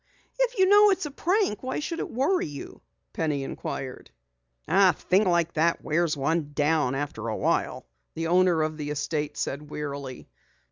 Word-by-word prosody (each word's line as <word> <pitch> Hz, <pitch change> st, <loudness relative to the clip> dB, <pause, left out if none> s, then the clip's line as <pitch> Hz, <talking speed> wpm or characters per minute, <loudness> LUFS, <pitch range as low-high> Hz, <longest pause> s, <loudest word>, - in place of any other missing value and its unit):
"If -, -, +1 dB
you 380 Hz, -, +5 dB
know 410 Hz, +2 st, +7 dB
it's 380 Hz, -3 st, +1 dB
a 295 Hz, -, -5 dB
prank 360 Hz, -, 0 dB
why 260 Hz, 0 st, -3 dB
should 330 Hz, +2 st, -4 dB
it -, -, -3 dB
worry 275 Hz, -, +1 dB
you?" 145 Hz, -2 st, -9 dB, 0.3 s
Penny 150 Hz, -4 st, -1 dB
inquired. 130 Hz, -1 st, -6 dB, 0.6 s
"A 190 Hz, +2 st, +5 dB
thing 195 Hz, +4 st, +2 dB
like 170 Hz, -2 st, +1 dB
that 165 Hz, +2 st, +1 dB
wears 160 Hz, 0 st, +1 dB
one 150 Hz, +1 st, -1 dB
down 145 Hz, -3 st, +2 dB
after 135 Hz, -5 st, -4 dB
awhile," 110 Hz, -, -1 dB, 0.3 s
the 165 Hz, -, -3 dB
owner 175 Hz, -1 st, +3 dB
of 155 Hz, 0 st, -3 dB
the 150 Hz, -1 st, -4 dB
estate 150 Hz, 0 st, -2 dB
said 145 Hz, +2 st, -4 dB
wearily. 140 Hz, -3 st, -6 dB
160 Hz, 160 wpm, -26 LUFS, 145-215 Hz, 0.6 s, know